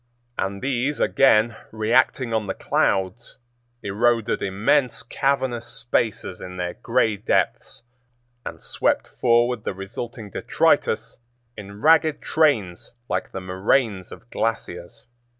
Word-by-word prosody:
And 100 +2 -3
these 135 +2 -1
again, 115 -4 +4 0.2
reacting 115 +2 +1
on 110 -2 0
the 95 - -3
clouds, 95 +5 -1 0.5
eroded 115 +2 +1
immense 110 +8 +1
cavernous 130 -2 -1
spaces 115 -5 -2
in 90 0 -8
their 90 -1 -3
gray 115 -3 0
depths 105 - -1 0.6
and - - -8
swept - - 0
forward 120 -1 +1
the 95 - -3
resulting 105 +3 -7
detritus 115 +5 +1 0.4
in 100 0 -10
ragged 160 -1 +4
trains 120 - 0 0.2
like - - -2
the 95 - -5
moraines 95 +2 0
of 120 - -12
glaciers. 115 -1 -4
115 Hz, 115 wpm, -23 LUFS, 100-125 Hz, 0.6 s, again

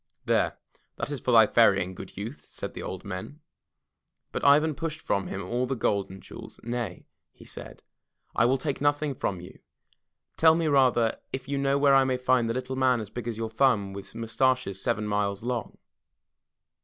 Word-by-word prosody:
"There, - - +1 0.4
that - - -4
is 145 - -3
for 125 - -1
thy 115 -2 +8
ferrying, 100 -5 +3
good - - -10
youth, 110 +8 -6
'* - - -23
said - - -6
the - - -7
old 95 +1 -6
men. 100 +10 -6 0.9
But - - -4
Ivan 150 +2 +5
pushed 155 +2 -4
from 100 -10 -1
him 95 - -4
all 120 +6 -1
the 135 - -1
gold 100 -4 0
and 95 0 -11
jewels. - - -11
"Nay,*' 120 -5 -4 0.3
he - - -17
said, - - -9 0.5
I 115 - +4
will 130 +2 +3
take 140 +1 -3
nothing 145 0 +1
from 95 -7 -3
you. 90 - -12 0.8
Tell 160 0 +6
me, 165 -1 0
rather, 130 -5 +3
if 130 0 -5
you 140 0 -1
know 140 0 +2
where 140 -1 +4
I 135 0 +6
may 130 -1 0
find 125 -2 +2
the - - 0
Little 130 +1 -3
Man 130 -2 +3
As 105 -3 -7
Big 120 -1 -6
As 115 -2 -3
Your 115 -1 -3
Thumb 110 -5 +2
With 100 0 -8
Mustaches 115 -3 0
Seven 105 +2 0
Miles 105 -1 -1
Long." 120 -1 -3
120 Hz, 195 wpm, -27 LUFS, 105-135 Hz, 0.9 s, thy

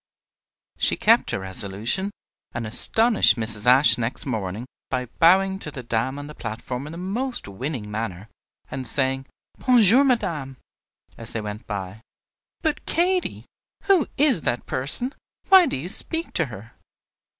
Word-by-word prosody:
She - - +1
kept - - +3
her - - -1
resolution, 100 - -3 0.4
and 120 -2 -4
astonished 215 - +4
Mrs. 110 -1 0
Ashe 130 +1 +6
next 120 +3 -3
morning, 110 -3 -4 0.2
by 125 0 -2
bowing 190 +3 +4
to 155 - -3
the 135 -4 -9
dame 120 +4 -2
on 145 - -7
the 150 - -10
platform 125 +3 -6
in - - -8
the 165 - -9
most 230 - -4
winning 115 +1 -6
manner, 105 -2 -5 0.4
and 130 -2 -6
saying, 135 +1 -1 0.3
"Bon 255 -1 +3
jour, 230 +6 +7
madame," 165 - -1 0.6
as 115 0 -3
they 110 - -3
went 105 0 -8
by. 100 0 -6 0.6
"But, 315 -2 -1
Katy, 360 +2 -1 0.4
who 380 -7 +3
is 270 - +4
that 120 -4 -2
person? 150 - +1 0.4
Why 380 -3 +7
do - - -2
you 145 +7 -6
speak 325 - +2
to 165 - 0
her?" 110 -1 -11
130 Hz, 150 wpm, -23 LUFS, -, 0.6 s, jour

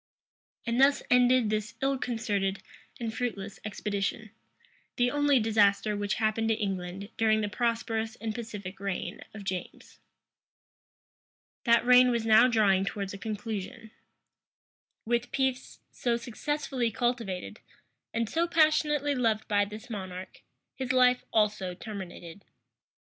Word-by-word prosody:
} - - -44
And 235 +1 +1
thus 280 +1 +4
ended 250 -2 +4
this 215 +1 -2
ill 270 0 +1
concerted 205 -6 -1 0.4
and 230 -2 -3
fruitless 205 -5 -4
expedition; 210 +1 -3 0.6
the 245 0 +2
only 290 -2 +3
disaster 210 -1 +3
which 205 0 -1
happened 220 0 0
to 225 - +3
England 195 -1 -4
during 220 -1 +3
the 210 - -1
prosperous 225 0 -1
and 225 -2 -4
pacific 205 -5 -7
reign 195 -1 -4
of 210 - -8
James. 185 -2 -6 1.7
That 235 0 +4
reign 250 0 +7
was 235 -2 0
now 225 +2 +7
drawing 205 -5 +3
towards 200 0 -4
a - - -6
conclusion. 215 0 -5 1.1
With 240 +1 0
peace, 265 -1 -2
so 235 -1 0
successfully 255 +1 -2
cultivated, 230 -5 -2 0.5
and 230 0 -1
so 335 +8 0
passionately 305 -3 +3
loved 225 -5 0
by 205 -1 +2
this 215 +3 -9
monarch, 185 -4 -7 0.3
his 260 -2 -3
life 250 -1 +4
also 210 -4 +1
terminated. 190 -3 -8
220 Hz, 125 wpm, -29 LUFS, 205-245 Hz, 1.7 s, reign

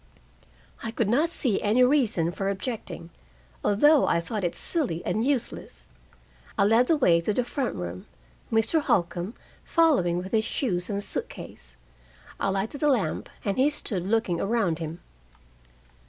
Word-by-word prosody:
I 225 - -4
could 225 -1 -1
not 295 +9 +3
see 250 - 0
any 220 +5 +3
reason 245 - +3
for 195 +2 -2
objecting, 190 -5 -5 0.5
although 290 +8 +4
I 170 - +2
thought 205 +4 -4
it 175 - -1
silly 225 - -2
and 215 +6 0
useless. 270 -2 -2 0.7
I - - +4
led 225 +5 +4
the 325 - +4
way 170 -11 +4
to 170 - 0
the 245 +4 0
front 255 +1 -3
room, 90 -1 -6 0.4
Mr. 225 +8 +2
Holcombe 175 -2 0 0.3
following 280 - +3
with 185 +2 -5
his 220 -1 +2
shoes 185 -7 -1
and 200 -1 -2
suit - - -2
case. - - -11 0.6
I - - 0
lighted 195 +9 -2
a 300 - +3
lamp, 250 -8 0 0.2
and 200 +3 -1
he 275 +3 +5
stood 195 -11 -3
looking 205 -6 +1
around 195 -6 0
him. 165 +1 -6
210 Hz, 155 wpm, -26 LUFS, 175-250 Hz, 0.7 s, he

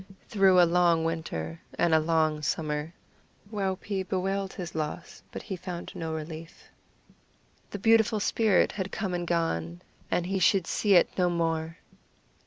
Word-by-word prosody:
Through 195 -4 +5
a 175 - +7
long 170 -1 +3
winter 85 - -4 0.2
and 170 -2 +2
a 160 - +6
long 155 -1 +1
summer 150 0 -2 0.6
Waupee 195 -1 -2
bewailed 190 +1 -2
his 175 -3 -6
loss, 155 +2 -5
but - - -7
he 195 - -5
found 180 -1 -7
no 165 -1 -4
relief. 160 +1 -8 1.0
The - - -5
beautiful 225 +1 +3
spirit 210 -1 +2
had 190 -1 -4
come 195 -3 -3
and 175 -1 -3
gone, 85 - -1 0.3
and 175 - 0
he 195 +1 -1
should 185 0 +3
see 205 +3 +2
it 175 - +4
no 180 -1 +3
more! 165 -1 -1
175 Hz, 150 wpm, -28 LUFS, 160-190 Hz, 1.0 s, a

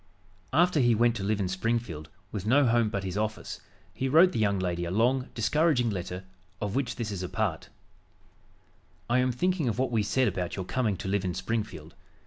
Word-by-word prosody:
After 170 +3 +3
he 120 -3 +4
went 120 +1 +3
to 95 - -4
live 105 +1 0
in 95 - 0
Springfield, 95 -5 -2 0.2
with 100 -4 -4
no 140 +4 +5
home 115 -2 +3
but 100 -2 -3
his 95 +1 -3
office, 110 0 -3 0.3
he 130 - -2
wrote 170 +6 +6
the 115 - -2
young 100 -2 +2
lady 90 -2 -1
a 85 - -3
long, 125 +7 +1
discouraging 125 0 +2
letter, 90 -1 -5 0.4
of 105 -2 -3
which 130 -1 -1
this 115 -4 -3
is 95 -3 -4
a 90 - -4
part: 105 -8 -2 1.4
"I 120 +2 +3
am 130 0 +2
thinking 165 +2 0
of 115 - -2
what 130 -1 0
we 115 -2 +2
said 130 +5 +2
about 90 -4 -2
your 95 - -4
coming 110 -3 0
to - - -6
live 100 0 0
in 90 -2 -2
Springfield. 115 -2 -4
110 Hz, 205 wpm, -28 LUFS, 95-125 Hz, 1.4 s, wrote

